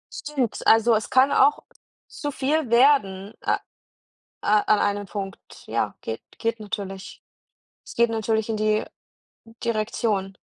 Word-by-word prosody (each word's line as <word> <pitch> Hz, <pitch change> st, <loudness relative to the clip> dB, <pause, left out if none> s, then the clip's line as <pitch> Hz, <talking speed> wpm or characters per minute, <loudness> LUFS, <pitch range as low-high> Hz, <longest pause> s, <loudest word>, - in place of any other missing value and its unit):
Stimmt, 270 Hz, -7 st, -2 dB
also, 225 Hz, +1 st, +6 dB
es 215 Hz, 0 st, 0 dB
kann 265 Hz, +2 st, +4 dB
auch 285 Hz, +1 st, +4 dB, 0.4 s
zu 290 Hz, -, -5 dB
viel 280 Hz, +1 st, 0 dB
werden, 225 Hz, -6 st, +3 dB
äh, -, -, +1 dB
äh, -, -, +1 dB, 0.8 s
an 210 Hz, 0 st, +3 dB
einem 205 Hz, 0 st, 0 dB
Punkt, 195 Hz, -1 st, -6 dB, 0.3 s
ja, -, -, -1 dB
geht -, -, -5 dB, 0.2 s
geht 230 Hz, -1 st, -2 dB
natürlich. 200 Hz, -2 st, -6 dB, 0.6 s
Es -, -, -11 dB
geht 235 Hz, 0 st, +3 dB
natürlich 220 Hz, -1 st, 0 dB
in 225 Hz, -, -1 dB
die 215 Hz, 0 st, +1 dB, 0.8 s
Direktion. 215 Hz, -3 st, -1 dB
220 Hz, 130 wpm, -24 LUFS, 205-240 Hz, 0.8 s, also